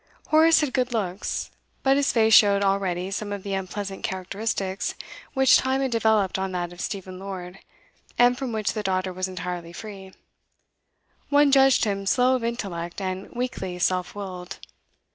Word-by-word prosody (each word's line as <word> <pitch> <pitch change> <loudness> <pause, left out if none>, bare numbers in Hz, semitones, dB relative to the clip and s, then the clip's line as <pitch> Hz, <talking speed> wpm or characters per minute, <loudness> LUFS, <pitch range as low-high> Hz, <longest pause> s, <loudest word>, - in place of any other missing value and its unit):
Horace 320 +1 +6
had 285 -4 -1
good 250 -1 0
looks, 195 -3 -3 0.3
but 270 0 +4
his 285 0 +2
face 220 -1 +3
showed 200 -2 +6
already 190 -2 0
some 205 +1 -4
of 200 -2 -5
the 200 - -4
unpleasant 195 +1 -4
characteristics 190 +1 -3 0.4
which 265 -1 +6
time 260 +1 0
had 265 -2 -1
developed 220 -4 +2
on 190 0 -3
that 175 -1 -3
of 175 - -9
Stephen 190 -3 -5
Lord, 190 -1 -7 0.6
and 245 0 +5
from 255 -1 -4
which 215 -2 -1
the 215 - -3
daughter 185 -2 -1
was 185 +1 -2
entirely 180 -2 -5
free; 195 -1 -9 1.2
one 285 0 +5
judged 270 -2 +5
him 195 -2 -2
slow 250 +6 +3
of 250 - -3
intellect 195 -8 -4
and 190 0 -4
weakly 215 -7 -3
self 180 +1 0
willed. 185 -2 -7
200 Hz, 160 wpm, -25 LUFS, 185-235 Hz, 1.2 s, Horace